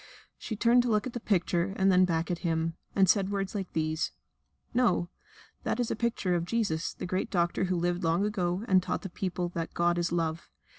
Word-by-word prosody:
She 220 Hz, -, -4 dB
turned 235 Hz, +3 st, +4 dB
to 245 Hz, -, -1 dB
look 210 Hz, -2 st, +2 dB
at 255 Hz, -, -5 dB
the 240 Hz, -, -3 dB
picture 185 Hz, -3 st, 0 dB
and 190 Hz, 0 st, +4 dB
then 185 Hz, 0 st, +5 dB
back 165 Hz, -1 st, -1 dB
at 175 Hz, -, -2 dB
him, 165 Hz, -1 st, 0 dB, 0.2 s
and 195 Hz, -1 st, +5 dB
said 195 Hz, +1 st, +3 dB
words 195 Hz, -1 st, -2 dB
like 195 Hz, -3 st, -4 dB
these: 155 Hz, 0 st, -1 dB, 0.6 s
"No, 225 Hz, -8 st, +2 dB, 0.5 s
that -, -, -2 dB
is 240 Hz, -, 0 dB
the -, -, -1 dB
picture 220 Hz, -5 st, 0 dB
of 170 Hz, -1 st, +1 dB
Jesus, 180 Hz, -5 st, -1 dB
the -, -, -5 dB
great 185 Hz, +1 st, -2 dB
Doctor 175 Hz, +1 st, +1 dB
who 185 Hz, 0 st, 0 dB
lived 175 Hz, +1 st, 0 dB
long 170 Hz, +4 st, +2 dB
ago 190 Hz, -1 st, -1 dB
and 185 Hz, -1 st, +5 dB
taught 185 Hz, -, -3 dB
the 195 Hz, -, -5 dB
people 180 Hz, -1 st, -3 dB
that 165 Hz, -1 st, -5 dB
God 175 Hz, 0 st, +2 dB
is 170 Hz, -1 st, 0 dB
Love. 165 Hz, -1 st, -2 dB
180 Hz, 215 wpm, -29 LUFS, 170-205 Hz, 0.6 s, then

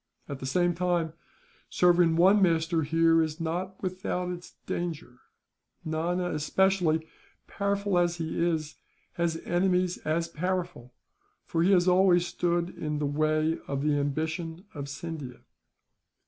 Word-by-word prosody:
At 140 Hz, -2 st, -6 dB
the 130 Hz, -, -5 dB
same 175 Hz, +5 st, +2 dB
time, 170 Hz, -2 st, 0 dB, 0.6 s
serving 175 Hz, -2 st, +4 dB
one 190 Hz, +5 st, +5 dB
master 165 Hz, -2 st, +2 dB
here 165 Hz, +2 st, +3 dB
is 155 Hz, 0 st, -2 dB
not 180 Hz, +4 st, -3 dB
without 180 Hz, -1 st, -2 dB
its 175 Hz, -1 st, -8 dB
danger 160 Hz, -8 st, -4 dB, 0.7 s
Nana 175 Hz, +3 st, -1 dB
especially, 160 Hz, 0 st, +1 dB, 0.4 s
powerful 200 Hz, -2 st, 0 dB
as 175 Hz, -1 st, +1 dB
he 165 Hz, 0 st, -2 dB
is, 160 Hz, -3 st, -1 dB, 0.4 s
has 170 Hz, -2 st, -1 dB
enemies 180 Hz, 0 st, +1 dB
as 165 Hz, +2 st, -1 dB
powerful; 175 Hz, -6 st, -4 dB, 0.5 s
for 165 Hz, -, -1 dB
he 180 Hz, +4 st, +4 dB
has 180 Hz, -2 st, +4 dB
always 180 Hz, -1 st, +4 dB
stood 175 Hz, 0 st, -1 dB
in 150 Hz, -1 st, -4 dB
the 150 Hz, -, -1 dB
way 155 Hz, +2 st, +1 dB
of 140 Hz, 0 st, -2 dB
the 150 Hz, 0 st, +2 dB
ambition 160 Hz, +5 st, -3 dB
of 140 Hz, -2 st, -6 dB
Scindia." 145 Hz, -4 st, -7 dB
170 Hz, 135 wpm, -28 LUFS, 155-180 Hz, 0.7 s, one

